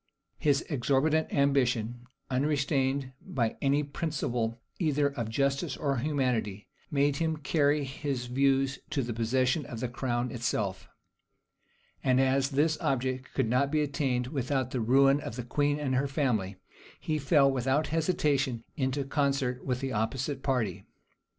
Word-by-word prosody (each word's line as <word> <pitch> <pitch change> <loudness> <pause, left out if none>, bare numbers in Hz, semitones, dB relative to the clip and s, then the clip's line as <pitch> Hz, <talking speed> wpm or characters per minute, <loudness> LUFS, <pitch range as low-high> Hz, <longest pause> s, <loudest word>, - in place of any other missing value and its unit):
His 145 -2 +2
exorbitant 145 +3 +1
ambition, 125 -4 +1 0.2
unrestrained 140 -1 0
by 115 -4 -1
any 140 +1 +2
principle 125 -6 -2 0.2
either 150 -4 +2
of 120 -6 -4
justice 140 +4 0
or 140 -3 0
humanity; 125 -7 -1 0.2
made 140 -1 +2
him 160 0 0
carry 145 0 +2
his 135 -1 -3
views 135 +1 +1
to 145 -4 0
the 120 0 -3
possession 130 +6 +1
of 120 -6 -6
the 125 - -1
crown 120 0 -2
itself; 105 -5 -2 1.1
and 130 -1 +3
as 135 0 +2
this 150 +3 +1
object 130 0 -1
could 135 -4 +1
not 130 +4 +2
be 155 0 +2
attained 135 -4 0
without 130 -1 -1
the 125 - -1
ruin 135 +4 +4
of 115 - -6
the 125 - -4
queen 145 +3 +1
and 140 -3 -1
her 135 +2 +1
family, 125 -9 0 0.4
he 155 -1 -1
fell, 140 -1 +4
without 135 +3 0
hesitation, 145 -7 +1
into 135 -1 -1
concert 135 -2 0
with 125 -1 -2
the 135 -1 -2
opposite 130 +6 -2
party. 110 -9 -1
135 Hz, 145 wpm, -29 LUFS, 125-145 Hz, 1.1 s, ruin